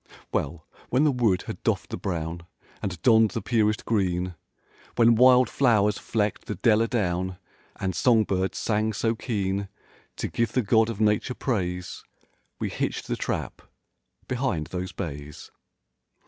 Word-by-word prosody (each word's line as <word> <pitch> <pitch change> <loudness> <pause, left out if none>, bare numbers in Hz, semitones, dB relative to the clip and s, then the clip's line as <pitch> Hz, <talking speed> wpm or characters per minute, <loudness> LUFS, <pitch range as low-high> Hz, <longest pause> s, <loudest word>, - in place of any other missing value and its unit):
Well, 80 +3 -2 0.2
when 130 +4 +3
the 150 - +4
wood 115 -8 +1
had - - -7
doffed - - -1
the - - -2
brown 85 -1 -4 0.3
And 90 -4 -4
donned 110 -3 +6
the - - -3
purest 110 -3 +1
green; 90 -4 0 0.6
When 115 -1 +6
wild 125 +2 +6
flow'rs 105 -6 +2
flecked 105 -3 -1
the - - -3
dell 110 -1 +3
a 115 - +2
down 95 -5 -1 0.4
And 95 -2 -3
song 115 -3 +4
birds 95 -2 -1
sang 110 0 0
so 115 +2 0
keen 100 -4 -2 0.5
To - - -3
give 115 -2 -1
the 125 - +2
God 110 +2 +3
of 110 -3 -5
nature 105 +3 +1
praise. 90 -7 -3 0.6
We - - -2
hitched - - -3
the - - -2
trap—behind 125 - -5
those 90 0 -3
bays. 75 -5 -7
105 Hz, 145 wpm, -26 LUFS, 90-115 Hz, 0.6 s, donned